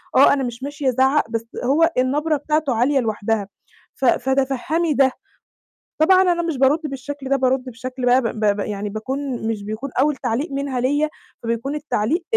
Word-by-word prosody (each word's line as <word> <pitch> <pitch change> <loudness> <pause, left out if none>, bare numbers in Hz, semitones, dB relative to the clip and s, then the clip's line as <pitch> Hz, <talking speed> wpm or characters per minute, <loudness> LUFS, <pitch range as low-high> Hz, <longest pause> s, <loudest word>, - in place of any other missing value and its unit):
آه، - - +7
أنا 275 -1 0
مش 240 +1 -5
ماشية 285 -1 -1
أزعّق، 265 0 +2
بس 230 0 -3 0.2
هو 320 +6 +3
النبرة 295 +5 +1
بتاعته 300 -2 0
عالية 265 +4 +2
لوحدها، 220 -2 -1 0.5
ف 270 - -2
فتفهّمي 270 +6 +1
ده." 270 -1 +4 0.9
طبعًا 370 +3 +6
أنا 350 -2 +2
مش 330 -5 -2
بارُدّ 275 +4 +4
بالشكل 275 -1 -6
ده، 275 - +3
بارُدّ 260 -1 +1
بشكل 255 +2 -5
بقى 250 +1 +5
ب 230 -2 -3
ب 205 0 +2
يعني 205 0 -3
باكون 255 +3 -4
مش 215 -3 -2
بيكون 220 +7 -5
أول 295 +1 +3
تعليق 270 +6 -2
منها 275 -2 -2
ليّا، 290 +4 +1 0.3
فبيكون 235 +5 -2
التعليق 300 - -1
265 Hz, 170 wpm, -21 LUFS, 235-290 Hz, 0.9 s, آه